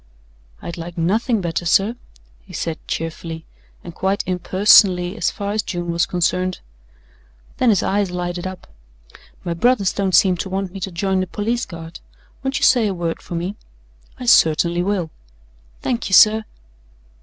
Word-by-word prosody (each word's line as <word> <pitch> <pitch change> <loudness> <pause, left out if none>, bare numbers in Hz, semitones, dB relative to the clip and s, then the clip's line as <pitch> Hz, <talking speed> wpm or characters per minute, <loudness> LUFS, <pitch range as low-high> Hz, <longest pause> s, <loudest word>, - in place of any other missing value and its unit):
"I'd 170 - -6
like 170 +1 -8
nothing 215 +6 +1
better, 170 0 -2
sir," 195 +6 +2 0.5
he - - -16
said 165 -2 -3
cheerfully, 165 0 -5 0.4
and 170 - -9
quite 190 +3 -1
impersonally 185 0 +4
as 220 - 0
far 200 0 -4
as 215 +1 0
June 175 -4 -4
was 170 0 +1
concerned. 180 +1 0 1.0
Then 255 - +3
his 205 -4 +3
eyes 200 -1 0
lighted 175 0 -4
up. 185 -1 -8 0.8
"My 170 - -2
brothers 200 +1 +2
don't 190 -3 0
seem 185 -2 +4
to 190 - -4
want 190 -1 -3
me 195 - -8
to 190 +1 -4
join 190 +2 0
the 185 - -1
Police 225 +6 -2
Guard. 165 -1 -9 0.4
Won't 270 0 -2
you - - -3
say 240 -4 +4
a 195 - -2
word 170 -2 -3
for 175 - -7
me?" 180 +4 -3 0.6
"I 250 - -6
certainly 170 -5 +4
will." 180 -4 -1 0.7
"Thank 240 -5 -2
you, - - -4
sir." 215 +2 +6
185 Hz, 165 wpm, -20 LUFS, 170-205 Hz, 1.0 s, sir